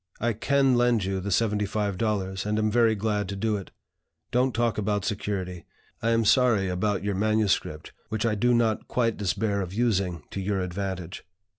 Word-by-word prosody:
I 120 +1 +1
can 135 +4 +2
lend 120 -3 +3
you 95 0 -1
the 100 +2 -4
seventy 105 0 +1
five 105 -1 -1
dollars, 95 -3 -1
and 105 +1 -1
am 110 0 +1
very 115 -1 +4
glad 105 -1 -1
to 100 - -3
do 110 +2 0
it. 100 -2 -6 0.6
Don't 125 +2 +2
talk 120 -2 0
about 105 -1 -1
security. 95 -4 -3 0.3
I 115 - +1
am 115 -1 +2
sorry 110 -4 +4
about 95 +2 -1
your 100 0 -1
MSS., 105 -1 +2 0.5
which 110 0 -1
I 115 - +2
do 120 +3 +2
not 115 -2 +1
quite 115 -3 +1
despair 100 +1 -1
of 95 0 -5
using 95 -8 0
to 100 - -4
your 100 0 -1
advantage. 90 -1 -4
105 Hz, 185 wpm, -26 LUFS, 95-115 Hz, 0.6 s, very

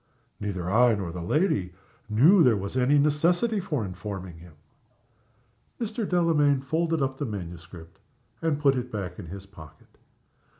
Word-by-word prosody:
"Neither 95 -5 -4
I 115 +4 +4
nor 95 -4 -4
the 90 +1 -6
lady 95 - 0 0.4
knew 150 - +6
there 125 -8 +5
was 100 +4 -5
any 130 +3 +3
necessity 170 +10 +2
for 150 - -2
informing 95 -2 -7
him." 85 -1 -14 1.3
Mr. 225 -2 -3
Delamayn 150 -6 +3
folded 160 +1 0
up 135 0 -3
the 145 - -1
manuscript, 85 -4 -9 0.4
and 160 -3 0
put 140 -2 +3
it 125 0 -4
back 95 -4 -5
in - - -8
his 95 +3 -9
pocket. 80 -7 -16
125 Hz, 145 wpm, -26 LUFS, 95-155 Hz, 1.3 s, knew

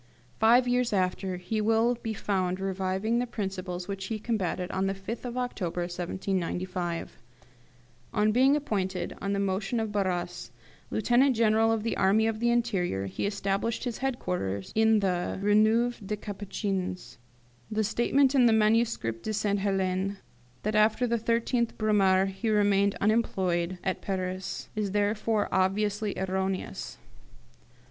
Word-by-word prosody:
Five 240 +3 +5
years 245 -2 +1
after 185 -1 0
he 215 +5 -2
will 225 +2 +3
be 225 -2 -5
found 185 -2 -1
reviving 195 +4 -1
the 245 - -1
principles 190 -5 -4
which 195 -1 -4
he 220 - -2
combated 195 -5 -2
on 190 +1 0
the 195 - -1
5th 215 +6 -6
of 245 0 -4
October 190 -9 -2
1795. 180 0 -3 0.9
On 215 -1 +2
being 260 +5 +4
appointed, 190 -10 -2
on 200 0 -1
the 200 - 0
motion 200 +4 -1
of 220 -1 -2
Barras, 180 -3 -2 0.4
Lieutenant 245 +4 +3
General 225 0 +3
of 225 -2 0
the 230 - -1
Army 200 +3 +3
of 225 -1 -1
the 235 +1 +2
Interior, 195 - 0
he 95 - -2
established 200 +2 -1
his 245 -3 -3
headquarters 180 - -2
in 220 -1 +4
the 180 -2 -1
Rue 205 +1 +2
Neuve 225 +3 +3
des 210 +2 -3
Capucines. 190 - -4 0.5
The 215 0 0
statement 255 +6 +2
in 255 -3 +5
the 225 - +4
'Manuscrit 215 - +2
de 215 - -3
Sainte 205 -1 0
Helene, 195 0 0 0.5
that 215 - -1
after 215 +3 +3
the 235 -1 0
13th 235 +1 0
Brumaire 195 -3 +3
he 195 +4 -3
remained 200 -1 +3
unemployed 185 -5 +1
at 190 - -2
Paris, 185 -1 -3
is 205 -2 -2
therefore 210 +1 +1
obviously 205 +2 0
erroneous. 190 0 -3
205 Hz, 145 wpm, -28 LUFS, 190-225 Hz, 0.9 s, Five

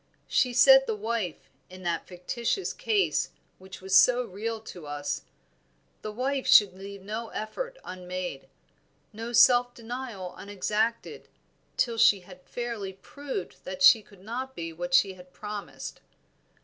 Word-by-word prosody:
She 250 - +2
said 270 +2 +7
the 220 - 0
wife, 215 -4 -3 0.2
in 185 0 -11
that 170 -1 -2
fictitious 230 - -2
case 440 -5 +1 0.3
which 190 0 -11
was 190 +1 0
so 250 +3 +6
real 225 +1 -4
to 175 -8 -10
us, 145 0 -4 0.8
the 215 - -5
wife 260 +4 -2
should 205 -3 +7
leave 195 0 -9
no 220 +3 -4
effort 485 - -5
unmade, 180 -5 -6 0.7
no 225 +2 -6
self 245 +1 +5
denial 230 -6 -6
unexacted, 215 - -2 0.5
till 230 -2 +1
she 200 -3 +6
had 180 0 -14
fairly 225 -2 -5
proved 265 0 -7
that 185 0 -4
she 220 +4 +9
could 200 -2 -19
not 255 +5 -5
be 165 -1 -5
what 175 +2 -1
she 195 +1 +4
had 180 0 -16
promised. 210 0 -7
210 Hz, 140 wpm, -28 LUFS, 185-240 Hz, 0.8 s, she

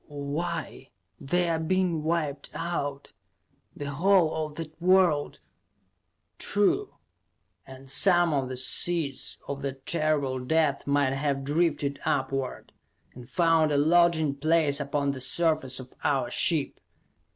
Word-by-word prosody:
"Why 150 +2 -5 0.3
they're 170 +2 0
being 175 -1 0
wiped 150 -3 -2
out; 145 -5 -4 0.6
the 145 0 -5
whole 175 +2 +3
of 155 -1 -4
that 160 0 -9
world 180 -5 +3 0.5
" 90 -1 -50
"True. 295 - +1 0.7
And 135 0 -12
some 175 +3 +3
of 135 -3 -1
the 130 - -5
seeds 140 +1 +1
of 140 0 -5
that 135 -1 -6
terrible 150 -5 0
death 145 +2 0
might 140 -2 +2
have 135 0 -1
drifted 145 -1 0
upward, 135 -1 -2 0.4
and 125 -1 -12
found 165 -3 +2
a 145 - +2
lodging 160 -1 +3
place 150 0 +1
upon 140 0 -1
the 135 -2 -7
surface 135 -1 0
of 130 0 -11
our - - 0
ship. - - 0
150 Hz, 125 wpm, -27 LUFS, 140-165 Hz, 0.7 s, whole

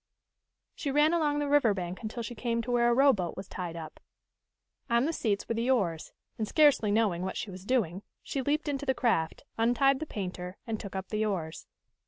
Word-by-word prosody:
She 290 - -4
ran 295 +4 +4
along 300 -3 +2
the 290 0 0
river 280 -8 +4
bank 180 -1 -4
until 235 +1 -4
she 240 - -5
came 230 0 -1
to 245 - -4
where 240 0 +4
a - - +4
rowboat 245 -10 +3
was 190 0 -6
tied 175 -2 -5
up. 160 -2 -8 0.9
On 235 +2 +3
the 325 - 0
seats 205 -8 -1
were - - 0
the 230 +2 -1
oars, 180 -11 0 0.3
and, 215 - -1
scarcely 290 -8 +4
knowing 205 -5 +2
what 190 +1 -3
she 205 - -4
was 185 +1 -10
doing, 200 -7 0 0.2
she 275 - -3
leaped 300 +4 0
into 285 -1 -2
the 265 - +2
craft, 165 -11 0 0.2
untied 265 +4 +3
the 315 - -4
painter, 180 -3 -5
and 225 -2 -3
took 200 -1 -8
up 190 0 -4
the 215 0 0
oars. 170 -7 -3
230 Hz, 210 wpm, -29 LUFS, 190-270 Hz, 0.9 s, ran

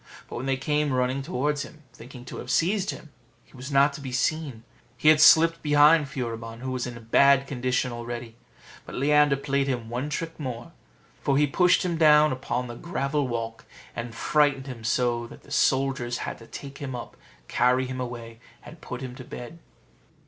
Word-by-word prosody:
But - - -7
when 130 +3 -4
they 135 -1 +1
came 150 +1 0
running 130 +1 0
towards 145 0 -1
him, 155 +2 -10
thinking 125 +1 -12
to - - -8
have 125 - -8
seized 185 +8 +1
him, 155 - -7 0.3
he - - -21
was 130 +3 -8
not 140 +1 +4
to 145 - -8
be 130 -2 -6
seen; 135 -2 -1 0.3
he 155 - +4
had 155 0 +6
slipped 165 +1 +6
behind 150 0 +5
Furibon, 115 -4 -5
who 130 0 -4
was 130 -1 -2
in 120 -1 -7
a - - -10
bad 135 +4 +4
condition 125 -1 -1
already. 120 -1 -6 0.5
But - - -10
Leander 150 +1 +4
played 140 0 -1
him 120 -4 -3
one 125 +5 -3
trick 165 +2 -4
more; 125 -5 -6 0.5
for 140 -1 +1
he 150 - +4
pushed 180 +6 +3
him 170 -2 -1
down 155 -1 +6
upon 125 -1 -3
the 120 - -7
gravel 140 0 -2
walk, 115 -1 -5 0.3
and 120 -1 -6
frightened 145 0 +2
him 125 -4 -8
so 120 +1 0
that - - -14
the - - -17
soldiers 130 -2 +1
had - - -6
to 115 - -14
take 140 -1 -9
him 130 -3 -5
up, 120 - -8 0.3
carry 125 +2 +2
him 130 0 -5
away, 115 -2 -7 0.3
and 165 - -12
put 125 - -7
him 130 -2 -6
to 130 - -10
bed. 125 +7 -9
135 Hz, 195 wpm, -26 LUFS, 120-150 Hz, 0.5 s, had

